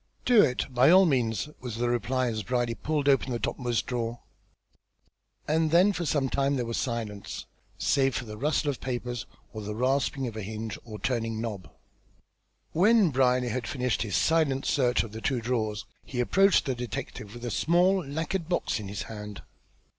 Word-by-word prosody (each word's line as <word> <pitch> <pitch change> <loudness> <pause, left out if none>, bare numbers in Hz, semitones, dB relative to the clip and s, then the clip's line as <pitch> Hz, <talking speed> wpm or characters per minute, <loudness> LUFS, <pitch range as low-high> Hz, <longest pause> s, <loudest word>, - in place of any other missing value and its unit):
"Do 240 -4 +7
it, 125 -7 +1
by 125 +3 +5
all 190 +2 +7
means," 125 - +1
was 125 -4 -6
the 120 +1 0
reply 125 +2 0
as 110 -3 -2
Brierly 120 +2 -1
pulled 145 +6 -2
open 135 -2 +3
the 120 - 0
topmost 120 -1 -1
drawer; 120 -1 -3 1.3
and 160 +1 +2
then 180 +5 +5
for 170 -1 -3
some 140 -3 +1
time 140 +1 +1
there 125 -3 -1
was 115 0 -3
silence, 110 -5 -4 0.3
save 135 -2 +2
for 120 - -3
the 105 -1 -7
rustle 145 +4 0
of 135 - -9
paper 125 -1 -3 0.4
or 110 - -5
the 105 0 -5
rasping 135 +3 0
of 115 -3 -5
a 110 - -4
hinge 110 +1 -5
or 110 -2 -8
turning 115 -2 -2
knob. 110 -5 -5 1.0
When 205 0 +4
Brierly 125 -1 +2
had 120 +1 -3
finished 125 -4 -1
his 105 -5 -2
silent 155 -5 +2
search 125 -4 +2
of 115 - -8
the 110 +1 -7
two 130 0 0
drawers, 110 -3 -2 0.2
he 125 - -6
approached 195 +11 +4
the 135 - 0
detective 120 -3 -6
with 120 0 -7
a 120 - -3
small 175 - +3
lacquered 160 +4 -3
box 175 -8 0
in 105 - -6
his 100 +1 -4
hand. 105 -2 -8
125 Hz, 185 wpm, -28 LUFS, 115-145 Hz, 1.3 s, Do